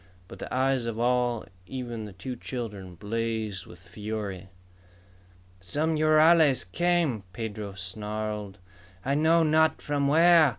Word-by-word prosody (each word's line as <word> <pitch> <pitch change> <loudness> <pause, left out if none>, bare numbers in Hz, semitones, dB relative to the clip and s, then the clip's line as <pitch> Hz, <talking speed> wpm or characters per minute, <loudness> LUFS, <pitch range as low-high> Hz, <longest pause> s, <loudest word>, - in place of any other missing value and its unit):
But - - -11
the - - -7
eyes 130 -2 +1
of 115 -1 -3
all, 120 -1 +1 0.2
even 120 -4 -5
the 105 - -8
two 125 +7 -6
children, 105 -8 -6
blazed 110 -1 -3
with 85 - -12
fury. 100 +1 -6 1.1
"Some 150 - 0
rurales 155 -2 +5
came!" 165 - +1
Pedro 105 -1 -5
snarled. 105 +1 -4 0.5
"I 135 - +1
know 160 +3 +4
not 160 0 +3
from 145 -1 0
where! 165 +1 +6
115 Hz, 125 wpm, -27 LUFS, 105-150 Hz, 1.1 s, where